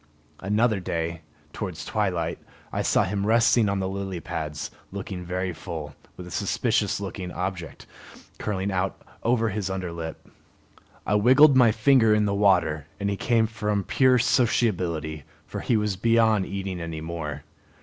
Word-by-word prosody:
Another 105 +2 +1
day, 85 -2 -3 0.3
towards 90 -7 -5
twilight, - - -1 0.3
I - - 0
saw - - +3
him 100 +1 -2
resting 115 -1 +4
on 100 - 0
the 95 -1 -1
lily 95 -1 -4
pads, 75 -2 -5 0.2
looking 95 -2 -6
very 90 +1 -2
full, 80 -3 -7 0.2
with 90 - -8
a 90 - -10
suspicious 105 +2 0
looking 95 -2 -5
object 90 -2 -5 0.5
curling 100 -1 -2
out 95 0 -1 0.2
over 115 -1 +2
his 100 -2 -3
under 95 -2 -3
lip. 80 -1 -7 0.8
I - - 0
wiggled 130 +7 +6
my 125 -4 +6
finger 110 -1 +4
in 105 0 +2
the 100 - 0
water, 90 -7 +2
and 100 0 -1
he - - -1
came 115 +2 +2
from 105 -2 -2
pure 130 +3 +4
sociability, 90 - +1 0.2
for - - -6
he 120 - +1
was 105 -2 0
beyond 110 -2 +3
eating 95 -2 -4
any 80 -1 -5
more. 80 -3 -5
100 Hz, 155 wpm, -25 LUFS, 90-110 Hz, 0.8 s, wiggled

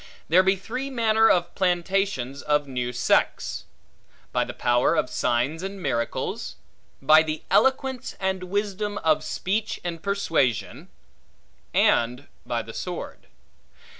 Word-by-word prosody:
There 175 +4 +6
be 190 +1 +3
three 250 +8 -5
manner 225 -3 +3
of 175 -1 +2
plantations 180 -7 0
of 150 -1 +1
new 125 -2 -3
sects. 125 - 0 0.7
By - - +1
the - - -6
power 120 +6 +2
of 155 -5 0
signs 125 +7 0
and 195 +1 -5
miracles; 120 -8 -2 0.5
by 155 +3 +7
the 155 -1 -4
eloquence, 265 -1 +1
and 190 -1 -1
wisdom, 205 +1 -2
of 155 -1 +3
speech 210 +4 -2
and 170 -2 -4
persuasion; 165 - -1 0.8
and 125 +4 +2 0.2
by 120 -1 -1
the 115 - -10
sword. 180 -1 -6
175 Hz, 125 wpm, -25 LUFS, 135-200 Hz, 0.8 s, by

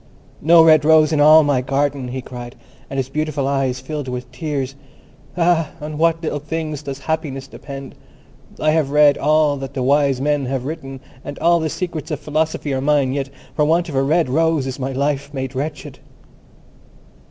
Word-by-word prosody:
"No 165 +2 +7
red 155 -2 +6
rose 155 0 +5
in 150 - +1
all 155 +1 +8
my 140 -3 +1
garden!" 135 0 -1
he 130 +1 -5
cried, 120 0 -9 0.3
and 135 - -5
his 130 -2 -1
beautiful 150 -1 -2
eyes 135 -2 0
filled 145 +1 -5
with 125 0 -6
tears. 135 -2 -3 0.6
"Ah, 170 -2 +2
on 150 0 -6
what 165 0 +2
little 150 -2 -2
things 155 0 -4
does 140 -2 -6
happiness 150 -4 -3
depend! 135 0 -9 0.7
I 155 - +2
have 155 -3 +1
read 145 0 +5
all 150 0 +3
that 135 0 -7
the 130 - -1
wise 140 -1 +2
men 145 -1 0
have 130 -1 -3
written, 135 -3 -6 0.2
and 145 - -7
all 170 0 +3
the 160 -1 -1
secrets 165 -2 -4
of 150 -3 -3
philosophy 155 -1 -2
are 130 - -1
mine, 140 -2 +2
yet 135 -1 -3 0.3
for 150 - +2
want 165 +3 +2
of 145 - -6
a 135 - +3
red 155 +4 +2
rose 160 +1 +1
is 135 +1 -5
my 135 +1 -2
life 140 +1 -1
made 130 0 -4
wretched." 145 0 -5
145 Hz, 185 wpm, -19 LUFS, 135-155 Hz, 0.7 s, all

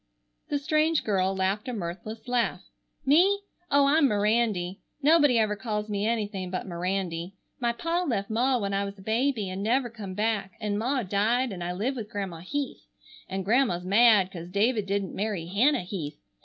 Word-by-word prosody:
The 290 - +1
strange 310 +2 +2
girl 195 -2 +1
laughed 195 +5 -1
a 250 - -3
mirthless 205 +4 -6
laugh. 245 -1 0 0.4
"Me? 365 +9 +4 0.3
Oh, 285 0 +5
I'm 285 +1 +5
Mirandy. 210 -4 +1 0.2
Nobody 290 -4 +5
ever 215 -2 +2
calls 210 -1 -3
me 205 0 -1
anything 205 -5 -2
but 185 0 -3
Mirandy. 180 0 -3 0.3
My 240 -2 +1
pa 335 +8 -1
left 200 - -1
ma 250 +4 +2
when 200 -3 -2
I 200 0 +1
was 200 0 -6
a 190 - -13
baby 225 0 0
an' 185 +1 -4
never 240 +3 +1
come 200 -5 -7
back, 210 -3 -1
an' 210 -2 -1
ma 255 +3 0
died, 220 +6 +1
and 180 -3 -5
I 175 +1 -2
live 230 +9 -1
with 215 -3 -5
Grandma 195 -6 -4
Heath. 275 - -4 0.4
An' 190 0 -3
Grandma's 205 -5 +2
mad 205 -1 +5
'cause 170 -1 -8
David 210 +2 +1
didn't 200 -1 -1
marry 200 -5 -2
Hannah 240 - +2
Heath. 160 -6 -5
210 Hz, 180 wpm, -27 LUFS, 190-245 Hz, 0.4 s, Oh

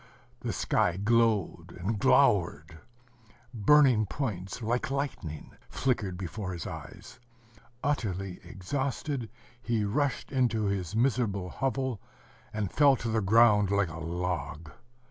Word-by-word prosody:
The - - -3
sky 85 - +1
glowed 110 -3 +1
and 100 +4 -2
glowered.... 80 -2 +3 0.7
Burning 120 -1 +5
points, 100 -4 -4
like 120 +4 -1
lightning, 135 - -4 0.2
flickered 105 -8 -1
before 95 +1 -5
his 85 -3 -6
eyes. - - -9 0.6
Utterly 95 -10 -2
exhausted, 130 - -3 0.3
he 115 -3 0
rushed 140 +6 -1
into 120 -5 +1
his 100 -2 -2
miserable 110 -6 +1
hovel, 130 -4 -2 0.5
and 105 -3 -3
fell 145 -2 +5
to 120 -2 -4
the 110 0 +1
ground 105 0 +5
like 100 -2 +1
a 80 +1 -7
log. 85 -3 -4
105 Hz, 115 wpm, -29 LUFS, 90-125 Hz, 0.7 s, Burning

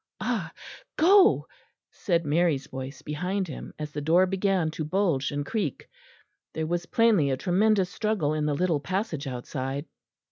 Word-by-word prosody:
"Ah! - - -2 0.5
go," 385 +5 +5 0.5
said 170 -4 -1
Mary's 150 -2 +1
voice 130 +1 -8
behind 180 +6 -2
him, 150 - -8
as 150 -1 -5
the 150 - -4
door 170 +5 +4
began 190 -3 0
to 155 - -4
bulge 160 -4 0
and 145 0 -3
creak. 195 - -3 0.7
There 160 - -1
was 175 +1 -2
plainly 225 - +3
a 130 - 0
tremendous 190 +3 +2
struggle 210 -9 0
in 150 -1 -1
the 145 - 0
little 170 -1 +1
passage 165 -2 -3
outside. 135 +3 -4
165 Hz, 150 wpm, -27 LUFS, 145-195 Hz, 0.7 s, go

